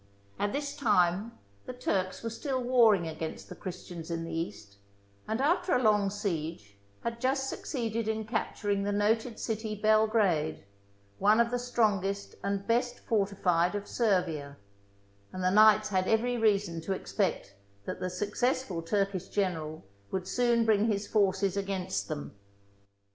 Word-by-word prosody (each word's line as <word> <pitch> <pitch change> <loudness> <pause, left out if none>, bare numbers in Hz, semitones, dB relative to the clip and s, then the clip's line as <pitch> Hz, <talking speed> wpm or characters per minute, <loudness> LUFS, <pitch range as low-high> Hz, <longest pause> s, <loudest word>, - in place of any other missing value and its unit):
At 205 - 0
this 285 +2 -3
time 205 -2 +2 0.3
the - - -4
Turks 190 -6 -2
were 230 - -3
still 260 +3 -2
warring 235 -8 +4
against 160 0 -6
the - - -8
Christians 175 -2 -7
in 165 -1 -2
the 165 0 -6
East, 110 - -5 0.5
and, 220 - -1
after 350 +6 +2
a 250 - +1
long 210 -2 +4
siege, 165 - -4 0.3
had 235 0 -4
just 270 +1 +1
succeeded 230 -5 -3
in 220 0 -1
capturing 205 -2 -1
the 200 +1 -1
noted 220 +3 +1
city 220 -1 -3
Belgrade, 215 - +2 0.5
one 210 +3 +5
of 235 0 +3
the 245 - 0
strongest 200 -5 0
and 200 0 -1
best 245 +1 0
fortified 195 -4 +1
of 205 0 -4
Servia, 170 - 0 0.7
and 185 - -5
the 185 - +3
knights 215 +1 +6
had 185 -2 +1
every 240 +2 +2
reason 200 -7 +1
to 190 +4 -2
expect 185 - -2 0.3
that - - -5
the 185 - -2
suc 180 +3 -3
cessful 245 -7 -1
Turkish 195 +1 -1
general 160 -6 -2 0.3
would 185 -1 -3
soon 240 -2 +2
bring 215 -1 +3
his 205 -2 0
forces 195 -2 +1
against 190 - -2
them. 70 0 -5
205 Hz, 150 wpm, -30 LUFS, 180-230 Hz, 0.7 s, knights